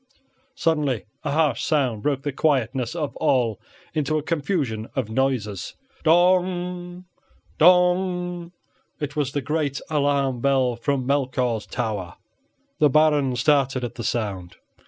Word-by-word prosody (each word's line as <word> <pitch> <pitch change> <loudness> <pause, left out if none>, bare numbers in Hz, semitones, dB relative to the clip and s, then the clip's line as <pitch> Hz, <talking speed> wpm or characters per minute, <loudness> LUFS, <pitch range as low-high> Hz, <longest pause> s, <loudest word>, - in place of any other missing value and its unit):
Suddenly 150 - 0 0.2
a 150 - -2
harsh 150 -3 +1
sound 130 -9 0
broke 140 0 -1
the 145 - -1
quietness 130 -3 0
of 155 -4 -3
all 120 -5 +1 0.3
into 155 -1 0
a 150 - -2
confusion 145 - -2
of 125 -5 -2
noises. 110 -6 -1 0.3
Dong! 180 +1 +1 0.5
Dong! 180 0 +3 0.5
it 145 -2 -4
was 140 -3 -1
the 145 - -1
great 150 -1 -1
alarm 140 -3 +1
bell 130 -2 +2
from 130 +2 -1
Melchior's 130 -5 0
Tower. 105 -7 -3 0.6
The 150 -2 +5
Baron 145 -3 +3
started 135 -1 +2
at 120 -1 -4
the 115 - -7
sound. 100 -5 -3
140 Hz, 125 wpm, -23 LUFS, 125-160 Hz, 0.6 s, The